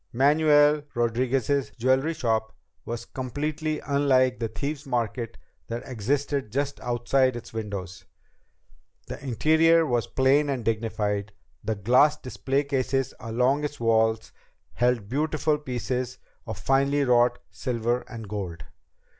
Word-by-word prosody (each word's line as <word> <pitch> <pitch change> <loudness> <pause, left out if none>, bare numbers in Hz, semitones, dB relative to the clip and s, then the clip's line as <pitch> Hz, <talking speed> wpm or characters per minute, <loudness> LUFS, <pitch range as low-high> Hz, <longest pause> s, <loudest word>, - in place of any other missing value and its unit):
Manuel 150 +2 +4
Rodriguez's 125 +3 +1
jewelry 130 +6 +2
shop 110 -3 -1 0.3
was 120 0 -5
completely 150 +4 -3
unlike 130 -3 +2
the 115 - -1
Thieves' 140 +6 -5
Market 115 -2 -2 0.3
that 115 +1 -4
existed 135 +1 -1
just 140 +3 -2
outside 125 +1 +1
its 120 -1 -9
windows. 100 -5 -5 1.0
The - - -8
interior 160 +6 +4
was 120 -5 0
plain 140 +3 +3
and 130 -5 -2
dignified, 105 -3 -1 0.3
and 105 -3 -2
glass 135 +7 +5
display 135 0 -1
cases 135 -1 -1
along 125 +5 +1
its 145 0 -4
walls 110 -1 +2 0.4
held 120 -4 +1
beautiful 150 +3 0
pieces 125 -2 -3 0.3
of 110 - -5
finely 140 +6 +2
wrought 120 -1 +3
silver 120 -1 -1
and 115 -3 -8
gold. 95 -7 -5
125 Hz, 120 wpm, -26 LUFS, 115-140 Hz, 1.0 s, glass